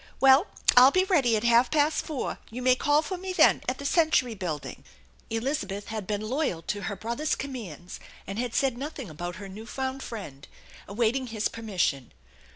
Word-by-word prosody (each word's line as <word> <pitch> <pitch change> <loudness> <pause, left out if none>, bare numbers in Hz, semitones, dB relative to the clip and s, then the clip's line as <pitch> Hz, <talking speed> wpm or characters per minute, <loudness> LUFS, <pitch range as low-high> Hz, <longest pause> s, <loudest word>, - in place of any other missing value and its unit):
Well, 270 +7 +6 0.3
I'll 250 +2 +9
be 370 +6 +3
ready 280 - +3
at 210 - -3
half 235 +1 +4
past 305 0 +2
four. 295 -5 -4
You 250 +3 -6
may 255 0 +5
call 290 +4 +2
for 370 0 -5
me 375 0 -4
then - - +5
at 255 - -2
the 280 - -8
Century 295 -6 +2
Building." 175 -7 -5 0.5
Elizabeth 225 -4 -3
had 215 -4 -5
been 210 -1 -2
loyal 250 - -1
to 205 +4 -3
her 200 - -3
brother's 235 +10 -2
commands 210 - -7 0.3
and 195 +3 -5
nad 245 -1 -3
said 265 -3 +1
nothing 275 - -6
about 175 +3 -5
her 200 0 -8
new 210 +4 -10
found 265 +1 -4
friend, 150 - -8 0.4
awaiting 240 +5 0
his 220 -2 -1
permission. 185 - -2
235 Hz, 180 wpm, -27 LUFS, 205-275 Hz, 0.5 s, I'll